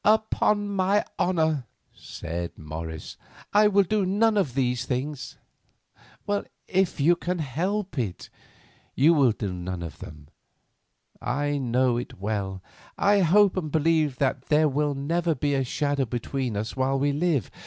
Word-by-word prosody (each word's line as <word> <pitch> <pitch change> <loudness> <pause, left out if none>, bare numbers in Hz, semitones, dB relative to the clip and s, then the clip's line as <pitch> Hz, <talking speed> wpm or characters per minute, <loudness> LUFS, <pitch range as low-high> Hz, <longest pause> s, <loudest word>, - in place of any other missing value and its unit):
"Upon 215 -1 +2
my 200 +1 +1
honour," 160 -8 +1 0.3
said 85 +1 -6
Morris, 80 +1 -7 0.4
"I 210 +1 +6
will 200 -1 +4
do 205 +2 0
none 210 +4 +2
of 155 -12 0
these 125 -2 0
things." 135 +2 -4 1.3
"If 190 -3 +1
you 165 +5 +5
can 175 +1 -3
help 170 - -2
it, 105 -7 -4 0.6
you 155 +6 +5
will 140 -6 +4
do 105 -3 -4
none 90 -1 -5
of 85 - -8
them. 75 -2 -11 0.9
I 145 +3 -1
know 125 -1 +1
it 120 - -6
well 100 -1 -2
enough. 95 -1 -8 0.4
I 205 0 +4
hope 195 +2 +4
and 160 -5 -3
believe 155 -3 +2
that 130 -1 -1
there 155 +1 +4
will 145 0 0
never 165 +4 0
be 145 +2 0
a 135 -1 +1
shadow 140 +2 0
between 120 0 -3
us 110 +2 -4
while 135 +1 +1
we 145 +1 +1
live. 145 - 0
145 Hz, 150 wpm, -26 LUFS, 120-175 Hz, 1.3 s, I